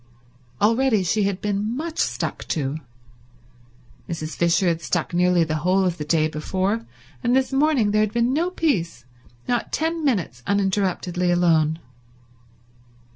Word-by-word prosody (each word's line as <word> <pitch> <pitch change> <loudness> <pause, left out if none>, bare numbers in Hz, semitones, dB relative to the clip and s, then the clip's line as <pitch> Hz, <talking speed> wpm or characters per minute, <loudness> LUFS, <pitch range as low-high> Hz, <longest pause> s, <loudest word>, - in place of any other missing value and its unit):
Already 225 0 +3
she 200 +3 +1
had 195 -1 -2
been 210 +3 -1
much 320 +2 -5
stuck - - -2
to. 145 -1 -2 1.3
Mrs. 160 -2 -4
Fisher 170 +2 +2
had 170 -1 0
stuck 175 +1 -2
nearly 180 0 +3
the 155 -1 -2
whole 185 +4 +2
of 175 -2 -1
the - - -2
day 155 +1 +2
before, 190 +8 -2 0.4
and 245 - +2
this 265 0 +1
morning 270 -7 +2
there 215 +1 +3
had 215 -1 +1
been 235 +2 +1
no 335 +5 +1
peace, 180 - -1 0.4
not 240 -1 -1
ten 325 +1 -1
minutes 180 - -1
uninterruptedly 190 -3 0
alone. 165 -3 +3
190 Hz, 140 wpm, -23 LUFS, 170-235 Hz, 1.3 s, Already